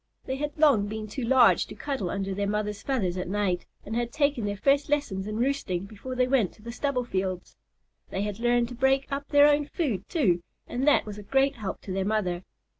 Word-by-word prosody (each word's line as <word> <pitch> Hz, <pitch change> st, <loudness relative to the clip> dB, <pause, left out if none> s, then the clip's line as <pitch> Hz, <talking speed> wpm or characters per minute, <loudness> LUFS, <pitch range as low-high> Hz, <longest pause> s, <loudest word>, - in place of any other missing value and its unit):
They 265 Hz, -, -3 dB
had 295 Hz, +2 st, -4 dB
long 280 Hz, -10 st, +4 dB
been 215 Hz, +1 st, -4 dB
too 245 Hz, +5 st, -5 dB
large 255 Hz, +2 st, +5 dB
to -, -, -9 dB
cuddle 265 Hz, -11 st, -3 dB
under 195 Hz, 0 st, -2 dB
their 200 Hz, +1 st, -1 dB
mother's 210 Hz, 0 st, -2 dB
feathers 195 Hz, -10 st, -1 dB
at 180 Hz, -, -3 dB
night, 190 Hz, -3 st, -1 dB, 0.2 s
and 220 Hz, -, -4 dB
had 240 Hz, 0 st, -1 dB
taken 285 Hz, -6 st, +1 dB
their 205 Hz, 0 st, -2 dB
first 280 Hz, +7 st, +2 dB
lessons 220 Hz, -10 st, -1 dB
in 215 Hz, 0 st, -3 dB
roosting 235 Hz, -8 st, -1 dB
before 220 Hz, +5 st, -7 dB
they 250 Hz, 0 st, +2 dB
went 250 Hz, -8 st, +2 dB
to 210 Hz, -, -20 dB
the 235 Hz, -, -6 dB
stubble 255 Hz, 0 st, -1 dB
fields. 185 Hz, -4 st, -3 dB, 0.5 s
They 195 Hz, -, -2 dB
had 210 Hz, 0 st, -4 dB
learned 240 Hz, 0 st, +2 dB
to -, -, -7 dB
break 265 Hz, +2 st, +2 dB
up 280 Hz, +1 st, -3 dB
their 290 Hz, 0 st, +6 dB
own 295 Hz, 0 st, +3 dB
food, 250 Hz, -, -2 dB
too, 185 Hz, -, +2 dB, 0.2 s
and 260 Hz, +4 st, -2 dB
that 295 Hz, -, +5 dB
was 210 Hz, -1 st, -7 dB
a -, -, -7 dB
great 270 Hz, +5 st, +1 dB
help 200 Hz, -4 st, -5 dB
to 190 Hz, -, -6 dB
their 190 Hz, 0 st, 0 dB
mother. 190 Hz, -4 st, -1 dB
230 Hz, 225 wpm, -27 LUFS, 200-275 Hz, 0.5 s, their